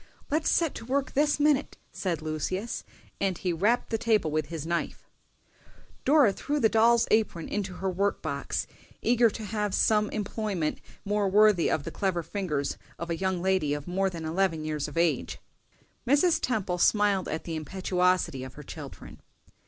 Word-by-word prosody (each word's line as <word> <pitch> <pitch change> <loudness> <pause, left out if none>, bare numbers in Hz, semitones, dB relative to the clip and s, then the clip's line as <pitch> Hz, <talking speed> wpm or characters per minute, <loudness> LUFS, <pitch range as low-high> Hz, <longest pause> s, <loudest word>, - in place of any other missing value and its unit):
"Let's 310 +2 +1
set 330 -4 +2
to - - -8
work 270 +2 -1
this 295 +1 +2
minute!" 295 -1 +2
said 170 -5 -3
Lucius, 185 +8 -3 0.4
and 190 -3 0
he 180 -2 -1
rapped 210 +10 +1
the 225 - 0
table 215 -8 +2
with 155 -1 -1
his 160 -3 -5
knife. 170 0 -3 1.0
Dora 280 -8 +5
threw 295 +7 -2
the 220 - +4
doll's 230 +2 +4
apron 215 -7 +1
into 190 -3 -3
her 190 +1 -2
work 200 +3 0
box, 140 -3 -2 0.4
eager 235 -1 +4
to 220 +1 -7
have 210 -1 -1
some 210 -1 +3
employment 205 -6 -2 0.3
more 205 -1 +1
worthy 210 -3 +5
of 150 - 0
the - - -6
clever 185 -4 -1
fingers 155 -8 -3 0.2
of 170 +1 -5
a - - +1
young 190 0 -1
lady 185 -6 +1
of 145 -1 -7
more 190 +2 +1
than 165 -3 -6
eleven 165 -1 0
years 155 -2 -2
of 150 - -9
age. 170 -1 +1 0.7
Mrs. 295 +6 +4
Temple 195 -7 -1
smiled 205 -1 +3
at 160 - -3
the 165 - -4
impetuosity 180 -3 0
of 130 -1 -9
her 150 - -9
children. - - -10
190 Hz, 170 wpm, -28 LUFS, 165-220 Hz, 1.0 s, Dora